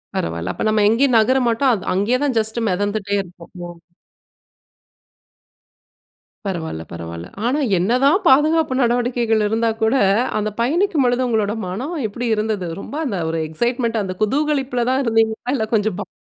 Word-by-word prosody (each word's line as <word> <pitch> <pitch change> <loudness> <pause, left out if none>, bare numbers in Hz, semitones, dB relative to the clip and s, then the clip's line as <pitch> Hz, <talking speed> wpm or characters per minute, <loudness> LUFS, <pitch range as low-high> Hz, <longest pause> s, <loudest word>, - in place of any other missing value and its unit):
பரவால. 85 +2 -3
அப்ப - - -4
நம்ம 215 -1 +2
எங்கேயும் 250 +3 +3
நகர 240 +4 +3
மாட்டோம் 245 +3 +2
அத 195 - -4
அங்கேயே 205 +7 +1
தான் 270 -4 0
ஜஸ்ட் 220 +2 -2
மெதந்துட்டே 205 +2 -1
இருப்போம். 175 -1 -15 0.2
ஓ! 175 0 -11 2.7
பரவால, 165 - -4
பரவால. 85 0 -7 0.2
ஆனா 270 +5 +1 0.2
என்னதான் 255 - +3
பாதுகாப்பு 300 +1 +4
நடவடிக்கைகள் 240 -2 +1
இருந்தா 225 +2 +1
கூட, 220 +2 +2 0.5
அந்த 215 0 -1
பயணிக்கும் 320 +3 +1
பொழுது 245 +1 +1
உங்களோட 215 -3 0
மனம் 255 - -4
எப்டி 240 +4 -4
இருந்தது? 210 -4 -2
ரொம்ப 285 - -8
அந்த 205 -9 -2
ஒரு 165 0 -2
எக்ஸைட்மென்ட், 235 +5 -1
அந்த 185 -1 -5
குதூகலிப்புல 270 -1 0
தான் 260 +1 +1
இருந்தீங்களா, 225 +1 0
இல்ல 220 -4 -1
கொஞ்சம் 210 -3 0
பயம் - - -6
225 Hz, 145 wpm, -20 LUFS, 200-255 Hz, 2.7 s, பாதுகாப்பு